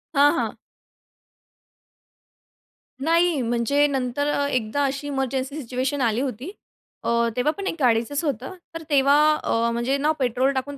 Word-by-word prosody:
हां, 285 Hz, +1 st, +6 dB
हां. -, -, -2 dB, 2.4 s
नाही, 330 Hz, 0 st, +2 dB
म्हणजे 240 Hz, +5 st, +1 dB
नंतर 270 Hz, +1 st, -1 dB
अ, 285 Hz, -, 0 dB
एकदा 255 Hz, +1 st, -1 dB
अशी 275 Hz, +1 st, -3 dB
इमर्जन्सी 270 Hz, 0 st, -2 dB
सिच्युएशन 260 Hz, +3 st, -2 dB
आली 230 Hz, -1 st, +1 dB
होती. 265 Hz, -, -4 dB, 0.5 s
अ, -, -, -1 dB, 0.3 s
तेव्हा 250 Hz, +5 st, +1 dB
पण 395 Hz, -1 st, -4 dB
एक -, -, -2 dB
गाडीचंच 250 Hz, +3 st, +1 dB
होतं, 275 Hz, -, -3 dB, 0.2 s
तर 330 Hz, 0 st, -6 dB
तेव्हा 280 Hz, -1 st, +4 dB, 0.3 s
अ, 230 Hz, +1 st, +1 dB
म्हणजे 240 Hz, +4 st, 0 dB
ना 295 Hz, +2 st, +1 dB
पेट्रोल 255 Hz, +1 st, +1 dB
टाकून 280 Hz, +2 st, -4 dB
270 Hz, 140 wpm, -23 LUFS, 245-285 Hz, 2.4 s, हां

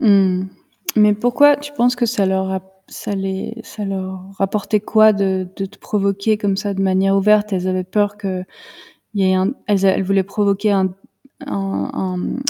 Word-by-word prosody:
Mmh, 190 Hz, -4 st, +4 dB, 0.5 s
mais 210 Hz, -1 st, +5 dB
pourquoi 245 Hz, +7 st, +4 dB
tu 290 Hz, +1 st, -9 dB
penses 245 Hz, -3 st, +2 dB
que 245 Hz, -1 st, +1 dB
ça 215 Hz, -4 st, +1 dB
leur 190 Hz, 0 st, 0 dB
a 190 Hz, 0 st, -2 dB, 0.3 s
ça -, -, -6 dB
les 195 Hz, +2 st, -3 dB
ça 210 Hz, -, -7 dB
leur 190 Hz, -1 st, -4 dB, 0.2 s
apportait 205 Hz, +2 st, 0 dB
quoi 215 Hz, +1 st, +5 dB
de 190 Hz, -2 st, -1 dB
de 195 Hz, -, -3 dB
te 200 Hz, -, -18 dB
provoquer 200 Hz, +1 st, 0 dB
comme 205 Hz, -2 st, -1 dB
ça 200 Hz, 0 st, -2 dB
de 195 Hz, -, -1 dB
manière 195 Hz, +1 st, +2 dB
ouverte? 210 Hz, +1 st, +3 dB
Elles 185 Hz, 0 st, -1 dB
avaient 185 Hz, 0 st, -1 dB
peur 205 Hz, +2 st, 0 dB
qu'il 190 Hz, -2 st, -4 dB, 0.7 s
y 195 Hz, -2 st, +1 dB
ait 185 Hz, -, +3 dB
un 190 Hz, +5 st, +1 dB
elles 200 Hz, -2 st, +1 dB
a 195 Hz, -, +6 dB
elles 190 Hz, -, 0 dB
voulaient 195 Hz, 0 st, +2 dB
provoquer 200 Hz, +1 st, 0 dB
un 190 Hz, -2 st, +1 dB, 0.5 s
un 195 Hz, -7 st, -3 dB
un, 185 Hz, -1 st, -3 dB
mmh, 255 Hz, +8 st, -3 dB
195 Hz, 190 wpm, -19 LUFS, 190-210 Hz, 0.7 s, a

